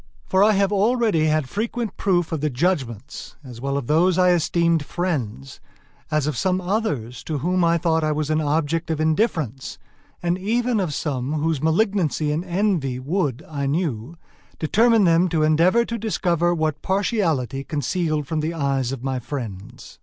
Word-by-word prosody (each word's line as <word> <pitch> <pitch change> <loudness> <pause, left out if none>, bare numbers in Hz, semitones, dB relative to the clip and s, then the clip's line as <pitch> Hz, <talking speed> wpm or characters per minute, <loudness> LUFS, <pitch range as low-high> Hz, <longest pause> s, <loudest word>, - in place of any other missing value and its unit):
For 190 +1 +3
I 215 +1 +5
have 200 0 +2
already 210 -5 +2
had 155 -3 +1
frequent 225 - -3
proof 175 -4 0
of 160 -3 -2
the 150 - +1
judgments, 130 - -2
as 125 -4 -10
well 140 +1 -1
of 140 - -3
those 170 +6 +3
I 180 -1 +5
esteemed 170 -1 +2
friends, 135 - -4 0.5
as 155 -2 +1
of 150 -2 -1
some 185 +5 +1
others 175 - -2
to 155 - -2
whom 180 +5 0
I 170 0 +3
thought 160 -1 +1
I 155 - +1
was 150 0 -1
an 155 0 +1
object 155 +2 0
of 160 -2 -1
indifference, 155 - -1 0.5
and 175 +1 0
even 235 +3 0
of 170 -7 -2
some 135 -2 -2
whose 155 -2 -1
malignancy 160 -3 +1
and 155 +3 -1
envy 175 -8 0
would, 145 -1 -2
I 140 -3 -3
knew, 145 -2 -2 0.4
determine 225 +7 +3
them 175 +1 +4
to 160 -2 +1
endeavor 170 +9 +3
to 235 0 -4
discover 175 -5 0
what 155 -3 -1
partiality 170 - 0
concealed 150 +2 -1
from 155 +3 -2
the 160 +2 -2
eyes 135 -4 0
of 135 -2 -6
my 135 -1 -1
friends. 115 -7 -8
160 Hz, 170 wpm, -22 LUFS, 140-185 Hz, 0.5 s, I